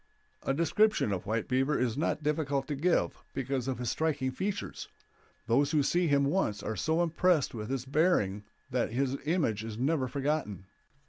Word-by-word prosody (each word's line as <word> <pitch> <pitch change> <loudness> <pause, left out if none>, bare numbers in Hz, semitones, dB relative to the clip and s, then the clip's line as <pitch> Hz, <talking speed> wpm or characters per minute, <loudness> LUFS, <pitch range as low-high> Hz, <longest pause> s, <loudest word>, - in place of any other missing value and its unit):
A - - -1
description 170 - +2
of 95 -2 -3
White 110 +1 -1
Beaver 135 +3 +1
is 120 -2 0
not 155 0 -1
difficult 145 -2 0
to 145 - -1
give, 170 +6 0
because 135 -1 -2
of 130 - -1
his 125 -1 -2
striking 145 -5 0
features; 195 +9 -4 0.6
those 130 +5 +3
who 150 -3 +2
see 175 +5 +2
him 140 -2 +3
once 140 - 0
are 110 - -3
so 160 - +1
impressed 170 -2 +2
with 110 -1 -5
his 130 -2 -2
bearing 135 - +2 0.3
that 125 -3 0
his 135 +1 0
image 150 - 0
is 110 -1 -6
never 135 +1 +1
forgotten. 135 - -2
135 Hz, 175 wpm, -30 LUFS, 120-160 Hz, 0.6 s, those